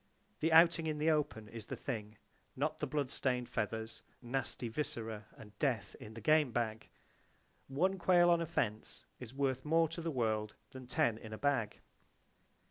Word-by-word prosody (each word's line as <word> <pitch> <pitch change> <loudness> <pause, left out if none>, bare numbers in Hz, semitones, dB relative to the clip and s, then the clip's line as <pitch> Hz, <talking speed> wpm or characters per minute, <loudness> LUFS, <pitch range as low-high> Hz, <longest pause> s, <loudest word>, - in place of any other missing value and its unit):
The 160 - +1
Outing 165 0 +6
in 155 -1 -1
the 155 +2 +3
Open 140 -8 -1
is 110 -1 -9
the - - -4
thing,—not 120 +7 -5
the 150 - -1
blood 140 -1 -1
stained 125 -2 0
feathers, 110 0 -3 0.2
nasty 125 -1 -3
viscera 110 -4 -4
and 105 -1 -13
Death 115 -8 0
in 110 +1 -10
the 115 - -7
game 155 +2 +4
bag. 110 -2 -2 0.8
One 185 +8 +1
quail 175 0 +5
on 170 -1 +4
a 165 - -2
fence 110 -10 -2
is 125 -2 -8
worth 130 -2 0
more 165 +2 +3
to 165 +2 -5
the 165 - -2
world 110 -6 0 0.2
than 130 -1 -9
ten 115 -2 +1
in 110 -1 -8
a - - -5
bag. 130 -6 0
130 Hz, 170 wpm, -35 LUFS, 110-155 Hz, 0.8 s, Outing